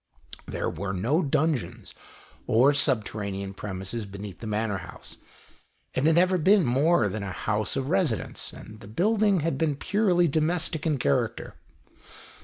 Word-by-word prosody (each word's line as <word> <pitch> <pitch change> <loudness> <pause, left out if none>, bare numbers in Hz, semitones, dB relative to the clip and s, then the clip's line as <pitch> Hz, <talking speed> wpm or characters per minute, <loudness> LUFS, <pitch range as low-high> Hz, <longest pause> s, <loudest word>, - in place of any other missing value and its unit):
There - - -3
were 95 +3 -3
no 120 - +1
dungeons, 150 -2 -1 0.5
or 130 +6 +5
subterranean 105 -7 -1
premises 100 +3 -5
beneath 100 -2 -8
the 115 - -7
Manor 105 -2 -1
House. 90 - -11 0.8
It 130 - 0
had 160 0 +4
never 180 +1 +3
been 190 +2 +4
more 135 +1 +3
than 105 +2 -4
a 100 -1 -4
house 105 +3 -2
of 135 -1 -2
residence, 155 - -1
and 110 0 -12
the 105 - -12
building 200 - +2
had 160 -3 -1
been 155 -3 +1
purely 185 +1 +2
domestic 160 +1 0
in 150 -3 +1
character. 70 - -1
130 Hz, 145 wpm, -26 LUFS, 105-165 Hz, 0.8 s, or